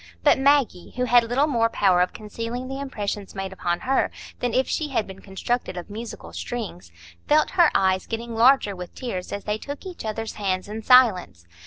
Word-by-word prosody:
But - - +5
Maggie, 270 -10 +2
who 250 - 0
had 245 0 +5
little 250 +5 +2
more 230 -6 +2
power 185 -5 +3
of 180 - +1
concealing 230 +4 -6
the 270 +1 -5
impressions 205 -7 -4
made 195 0 -4
upon 175 -2 -2
her 265 +1 +1 0.3
than 245 - -1
if 260 +3 +1
she 310 - -1
had 260 -6 -1
been 190 0 -11
constructed 195 +1 -3
of 175 +3 -7
musical 225 +2 -8
strings, 195 - -6 0.4
felt 305 +1 +3
her 345 -4 +5
eyes 190 -1 +2
getting 230 +1 -4
larger 230 -3 +4
with 180 -1 -9
tears 190 -8 -5
as 200 - -4
they 210 +1 -2
took 285 - -7
each 365 -2 -7
other's 220 0 -4
hands 185 -1 -1
in 215 +2 -6
silence. 195 - +4
225 Hz, 195 wpm, -24 LUFS, 190-255 Hz, 0.4 s, But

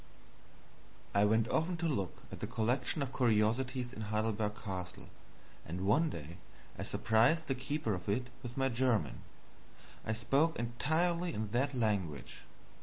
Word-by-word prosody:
I 100 0 +5
went 110 +2 +3
often 170 +2 +1
to 165 0 0
look 100 - -2
at - - -7
the - - -3
collection 125 +6 0
of 130 -1 -5
curiosities 125 +2 +2
in 110 - -6
Heidelberg 105 0 0
Castle, 90 -4 -6 0.5
and 90 +4 -4
one 155 +11 +4
day 85 - -7 0.4
I - - -6
surprised 120 +9 +3
the 135 - 0
keeper 130 -2 -1
of 90 +1 -4
it 125 +5 -1
with 120 +1 -7
my 135 0 +2
German. 120 -2 +1 0.8
I 110 - -1
spoke 135 +8 +2
entirely 165 +9 0
in 105 -1 -3
that 135 +4 +1
language. 100 - -1
120 Hz, 145 wpm, -34 LUFS, 105-135 Hz, 0.8 s, I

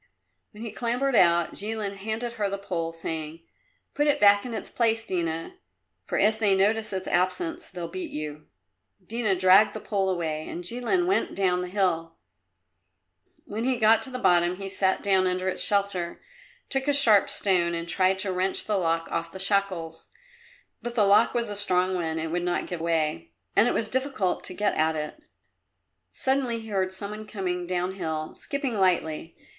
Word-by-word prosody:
When 215 +1 -11
he 230 - -5
clambered 245 +4 0
out 170 -3 +4
Jilin 210 -1 -3
handed 220 +4 -3
her 210 -3 -1
the 200 - -3
pole, 170 -4 -3
saying, 165 0 -5 0.5
"Put 295 +1 +1
it 290 - +2
back 205 +2 +5
in 235 - -5
its - - -5
place, 225 -1 +1
Dina, 165 -5 -3 0.5
for - - -2
if 215 +2 +3
they 205 -3 +3
notice 215 +3 +1
its 190 -1 -4
absence 330 - -1
they'll 175 -2 -6
beat 185 +2 -6
you." 150 0 -6 0.6
Dina 220 -1 0
dragged 190 +3 +5
the - - -4
pole 195 -3 -1
away, 160 -4 -3
and 175 - -6
Jilin 245 - 0
went 385 +2 0
down 185 -2 +1
the 180 - -4
hill. 175 -4 -1 1.3
When 215 +3 -4
he 260 +1 +2
got 225 0 +5
to - - -6
the 255 - -5
bottom 175 -5 +3
he 195 +1 -6
sat 190 0 0
down 190 -2 +3
under 185 +1 -1
its 185 - 0
shelter, 200 -4 0 0.5
took 270 0 -2
a 290 - +3
sharp 220 -8 +6
stone 175 -3 +2
and 170 0 -4
tried 185 +2 +2
to 190 - -1
wrench 185 +1 0
the 210 -2 0
lock 165 -1 0
off 165 0 -3
the 190 - -8
shackles. 190 -5 -1 0.7
But 240 0 -6
the 215 -4 +4
lock 205 +5 +4
was 235 -3 -1
a - - -4
strong 185 -2 +1
one 165 -3 -2
and 160 0 -3
would 175 +1 -1
not 175 0 -1
give 175 -2 -5
way, 155 - -1 0.2
and 220 - +5
it - - +1
was 220 - 0
difficult 260 -6 -1
to 185 - -4
get 205 +1 +1
at 160 0 +1
it. 155 - -5 0.9
Suddenly 260 -3 0
he 220 - -10
heard 190 -2 0
some 200 +2 -5
one 215 0 -8
coming 180 -4 -3
downhill, 175 -4 -3
skipping 280 -3 -3
lightly. 170 -5 0
190 Hz, 185 wpm, -26 LUFS, 175-220 Hz, 1.3 s, sharp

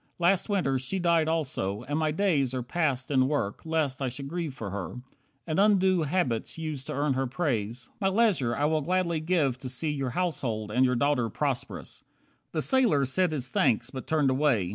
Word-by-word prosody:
Last 180 +4 +2
Winter 155 -10 +1
she 130 +9 -3
died 170 -3 +2
also, 130 -10 -1
and 145 +4 -2
my 155 -1 +1
days 150 -7 +1
Are 125 - -2
passed 135 -2 -1
in 130 -2 +3
work, 135 -9 -2
lest 150 -4 0
I 130 - 0
should 135 +3 -7
grieve 165 -3 -4
for 105 -6 -6
her, 100 +5 -5 0.4
And 160 +1 -1
undo 190 -3 +4
habits 145 -8 -1
used 155 -4 -5
to - - -3
earn 145 0 +1
her 130 0 -1
praise. 120 -5 -2
My 195 - +1
leisure 190 - +2
I 145 - 0
will 155 0 +2
gladly 170 0 0
give 155 -6 +1
to 130 - -6
see 150 +5 -2
Your 135 -3 -2
household 120 -9 -2
and 125 +4 +3
your 125 0 +2
daughter 125 -2 +1
prosperous." - - -3 0.5
The 155 - -1
sailor 235 - +3
said 180 +6 +1
his 135 -5 0
thanks, 115 -2 +1
but 130 -3 -7
turned 150 -4 +2
away. 130 -9 +2
145 Hz, 195 wpm, -28 LUFS, 130-170 Hz, 0.5 s, undo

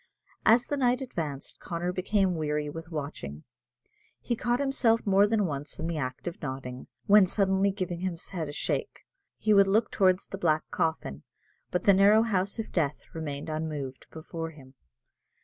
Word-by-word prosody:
As 235 +3 +6
the 290 - -2
night 250 -2 +2
advanced, 160 - -5
Connor 175 +1 -3
became 190 0 +1
weary 150 -2 -1
with 165 +2 -8
watching. 140 - -6 0.8
He 240 - -2
caught 240 +1 0
himself 255 -5 +2
more 200 0 +5
than 210 -1 +2
once 145 -2 -4
in - - -3
the 165 -2 -2
act 130 +4 -4
of 175 - -5
nodding, 130 -3 -6 0.2
when 205 -2 +7
suddenly 195 0 +2
giving 185 -3 -3
his 180 -1 -3
head 165 -6 -4
a - - -4
shake, 145 - -3 0.3
he 215 - +2
would 200 -1 +6
look 215 +4 +2
towards 185 -1 +3
the 195 - -7
black 155 -4 +2
coffin. 155 - -1 0.5
But 180 - -1
the 200 - +6
narrow 205 +3 +6
house 195 -3 0
of 225 - -5
death 150 -4 -1
remained 145 -3 -5
unmoved 155 -4 -4
before 165 +1 -6
him. 135 -4 -15
175 Hz, 170 wpm, -28 LUFS, 150-200 Hz, 0.8 s, when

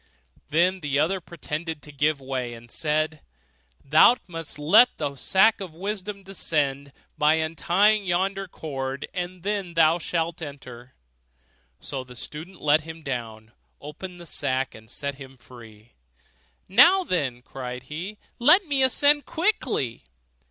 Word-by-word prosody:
Then 180 +4 +2
the 145 -4 -1
other 175 +6 +1
pretended 160 -1 -6
to 150 - -10
give 145 +1 +1
way, 130 -3 -4
and 115 +1 -14
said, 155 0 -1 0.6
'Thou 155 - +7
must 165 -4 -6
let 205 +12 +6
the 145 -2 -3
sack 195 - +3
of 180 -5 -7
wisdom 200 +2 -4
descend, 145 -7 -1 0.3
by 150 +1 +5
untying 180 +6 +2
yonder 195 +2 0
cord, 135 -5 -5
and 180 -1 -5
then 195 -4 -2
thou 165 +1 +4
shalt 170 0 -2
enter.' 130 -4 -10 0.8
So 135 -2 -5
the 125 -1 -14
student 160 +9 -8
let 150 +1 +4
him 160 +1 -10
down, 115 -5 -5 0.3
opened 175 +5 -9
the 175 - -10
sack, 130 -4 -1
and 110 0 -14
set 140 -1 -5
him 135 -1 -11
free. 115 -3 -15 0.7
'Now 370 - +6
then,' 135 - -2
cried 125 -1 -7
he, 170 +10 -7 0.2
'let 360 +11 +6
me 285 -4 +1
ascend 285 +3 +4
quickly. 265 - -1
155 Hz, 140 wpm, -25 LUFS, 135-190 Hz, 0.8 s, Thou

